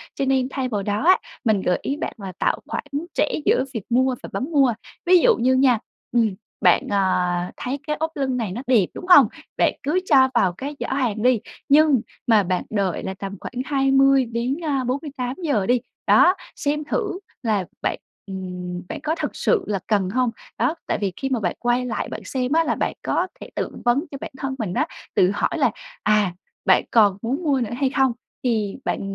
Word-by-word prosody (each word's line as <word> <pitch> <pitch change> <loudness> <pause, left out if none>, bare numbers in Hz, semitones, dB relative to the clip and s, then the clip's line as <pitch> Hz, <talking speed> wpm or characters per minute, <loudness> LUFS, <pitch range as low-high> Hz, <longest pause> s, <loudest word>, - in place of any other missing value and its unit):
Cho 275 - -1
nên 265 -1 +2
thay 265 -1 -2
vào 205 -4 -2
đó 205 +5 -1
á, 370 - +7 0.3
mình 215 -4 +2
gợi 180 - +1
ý 280 - -2
bạn - - -4
là 195 -3 -6
tạo - - +1
khoản - - -3 0.3
trễ - - +2 0.2
giữa 255 - +3
việc 225 -5 -4
mua 255 +2 +2
và - - -7
bấm - - -2
mua, 275 -6 +4 0.3
ví 365 +1 +7
dụ - - +5
như 255 +2 +2
nha, 260 -3 +4 0.3
ừm, 225 -4 +2 0.3
bạn, - - +4
à, 180 -2 +1
thấy 260 +3 -3
cái 300 - 0
ốp 320 +1 -1
lưng 265 -2 -1
này 220 -6 -2
nó 225 +7 -4
đẹp, 235 -7 +4
đúng - - -8
hông? 290 -10 +8 0.3
Bạn - - +3
cứ 300 +6 +1
cho 265 -6 +5
vào 190 -7 +3
cái 280 +10 -6
giỏ - - -3
hàng 245 -6 -1
đi, 250 -2 +4 0.3
nhưng 290 -3 +5 0.3
mà 220 -3 +5
bạn 185 0 -1
đợi 195 -5 -1
là 190 - -3
tầm 195 +1 -6
khoảng 250 - -5
20 270 -1 +4
đến, 235 +4 -2
a, 275 -4 0
48 255 -1 -3
giờ 240 - +1
đi. 245 +2 +2 0.3
Đó, 365 +1 +6 0.2
xem 300 +1 -1
thử 375 +3 -2 0.2
là 210 -5 +1 0.2
bạn, - - -1 0.3
ừm, 180 -2 -5
bạn - - -5
có 315 +1 0
thực - - -4
sự 445 -6 +1
là 205 -2 -1
cần 200 -4 +1
hông? 250 +3 +1 0.3
Đó, 250 +8 +1
tại - - 0
vì 195 -3 -1
khi 270 - -2
mà 255 -3 0
bạn 180 -5 -1
quay 245 +1 +1
lại 230 -3 -3
bạn - - -6
xem 255 -1 -2
á, 325 +2 +4
là - - 0
bạn - - -1
có 360 - 0
thể - - -8
tự - - -2 0.2
vấn 245 +5 +3
cho 280 - -5
bản - - -6
thân 265 0 -3
mình 205 -6 -2
á, - - +1 0.3
tự 180 - +4
hỏi 205 - -1
là - - +3 0.3
à 210 -4 +3 0.3
bạn - - +5
còn 205 -4 +5
muốn 270 +9 -2
mua 280 -4 +2
nữa 230 -2 -2
hay 275 -2 +2
không? 265 -2 +2 0.3
Thì 220 -5 0
bạn - - -1
250 Hz, 215 wpm, -22 LUFS, 205-275 Hz, 0.3 s, hông